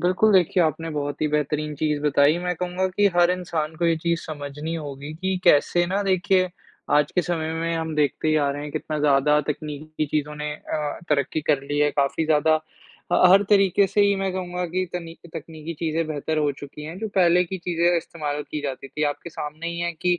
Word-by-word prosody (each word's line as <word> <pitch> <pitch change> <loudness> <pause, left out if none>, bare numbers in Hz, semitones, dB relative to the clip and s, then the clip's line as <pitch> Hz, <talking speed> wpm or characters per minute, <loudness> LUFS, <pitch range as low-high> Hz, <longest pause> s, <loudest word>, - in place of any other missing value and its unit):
बिल्कुल, 185 +4 +3
देखिए 180 -1 +4
आपने 165 0 -1
बहुत 145 -1 -3
ही - - +3
बेहतरीन 150 0 -1
चीज़ 150 0 -1
बताई, 145 +2 +4
मैं 180 0 -2
कहूँगा 180 +1 -1
कि 205 0 +5
हर 175 0 +5
इंसान 165 -4 -2
को 170 - +1
ये 165 -1 +3
चीज़ 170 +1 -1
समझनी 150 +1 -5
होगी 145 -2 -6
कि 190 0 0
कैसे 175 +1 +4
ना 195 +3 0
देखिए, 185 -1 +2 0.4
आज 145 0 +3
के 180 - +2
समय 160 -2 -2
में 165 +1 -1
हम 160 -1 -3
देखते 150 +1 +1
ही 155 - +3
आ 145 -2 +2
रहे 145 +1 -5
हैं 150 - -6
कितना 155 -1 -3
ज़्यादा 150 +1 +4
तकनीकी 155 +1 -4
चीज़ों 150 0 -2
ने 150 0 -3
अ, 150 -1 -4
तरक्की 150 +1 +1
कर 140 -2 +2
ली 145 +1 -3
है 150 0 +3
काफ़ी 140 +3 0
ज़्यादा। 155 0 +4
ह 155 - 0 0.7
हर 195 +2 +7
तरीक़े 195 -1 +4
से 205 - +1
ही 200 0 +4
मैं 195 -1 -1
कहूँगा 180 -1 -3
कि, 185 +2 -1
तनि 170 -2 -5 0.2
तकनीकी 160 +1 -7
चीज़ें 165 -1 0
बेहतर 155 +1 -2
हो 150 -1 +2
चुकी 145 +2 -10
हैं, 165 +4 -7
जो 220 +1 -3
पहले 180 -1 +5
की 190 +2 -5
चीज़ें 175 0 +1
इस्तेमाल 150 -3 -3
की 150 - -3
जाती 135 -1 -5
थीं, 150 +3 -2
आपके 145 +4 -4
सामने 155 +1 -6
ही 170 0 -5
है 170 0 -1
कि 175 +2 0
160 Hz, 215 wpm, -24 LUFS, 150-175 Hz, 0.7 s, हर